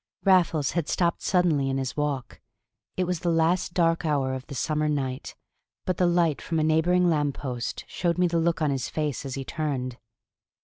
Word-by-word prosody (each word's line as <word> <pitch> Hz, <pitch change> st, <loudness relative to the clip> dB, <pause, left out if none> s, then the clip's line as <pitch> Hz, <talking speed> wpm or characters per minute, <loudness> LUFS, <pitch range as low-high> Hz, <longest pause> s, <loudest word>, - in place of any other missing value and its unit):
Raffles 170 Hz, -7 st, +3 dB
had 170 Hz, -3 st, -2 dB
stopped 170 Hz, -2 st, +1 dB
suddenly 165 Hz, -7 st, +2 dB
in 135 Hz, -, 0 dB
his 130 Hz, -2 st, -3 dB
walk. 145 Hz, -4 st, -3 dB, 0.6 s
It 185 Hz, -, +2 dB
was 180 Hz, -1 st, -1 dB
the 175 Hz, -, -1 dB
last 170 Hz, +2 st, +1 dB
dark 165 Hz, -1 st, +2 dB
hour 140 Hz, -4 st, 0 dB
of 130 Hz, 0 st, -6 dB
the 140 Hz, -, -7 dB
summer 150 Hz, +3 st, 0 dB
night, 135 Hz, -3 st, -3 dB, 0.5 s
but 185 Hz, -2 st, -1 dB
the 180 Hz, -, +3 dB
light 170 Hz, -4 st, +2 dB
from 165 Hz, -, -2 dB
a -, -, +2 dB
neighboring 170 Hz, +3 st, +3 dB
lamppost 140 Hz, -6 st, -2 dB
showed 170 Hz, -2 st, -1 dB
me 180 Hz, -, +3 dB
the 170 Hz, -1 st, +1 dB
look 165 Hz, -1 st, +1 dB
on 150 Hz, -, +2 dB
his 135 Hz, -3 st, -2 dB
face 150 Hz, -3 st, -2 dB
as 130 Hz, -, -5 dB
he 135 Hz, -1 st, -5 dB
turned. 130 Hz, -6 st, -3 dB
155 Hz, 190 wpm, -26 LUFS, 135-170 Hz, 0.6 s, Raffles